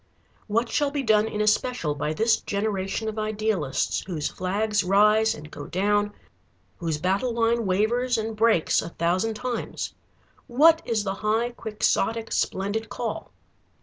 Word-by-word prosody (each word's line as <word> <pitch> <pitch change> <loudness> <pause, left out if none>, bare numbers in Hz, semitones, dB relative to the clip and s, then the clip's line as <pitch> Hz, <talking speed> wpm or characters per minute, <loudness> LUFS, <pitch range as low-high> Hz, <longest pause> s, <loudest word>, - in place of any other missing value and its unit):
What 230 +3 +1
shall 290 +4 +1
be 280 -1 -2
done 215 -2 +3
in 210 -1 -3
especial 210 -5 +1
by 145 +1 -2
this 220 +8 +2
generation 200 +1 -2
of 220 0 -3
idealists, 215 -10 -1
whose 160 -6 -2
flags 205 +3 0
rise 210 +4 +4
and 150 +1 -11
go 145 - -8
down, 205 +2 +1 0.7
whose 165 -3 -1
battle 195 +9 0
line 230 -1 +1
wavers 235 +6 +1
and 220 0 -3
breaks 220 -6 +3
a - - -6
thousand 185 +7 0
times? 250 +1 -4 0.5
What 315 +6 +5
is 225 -3 0
the 195 -1 -2
high 220 +3 +1
quixotic 225 0 -1
splendid 205 +4 -1
call? - - -5
215 Hz, 145 wpm, -25 LUFS, 190-230 Hz, 0.7 s, What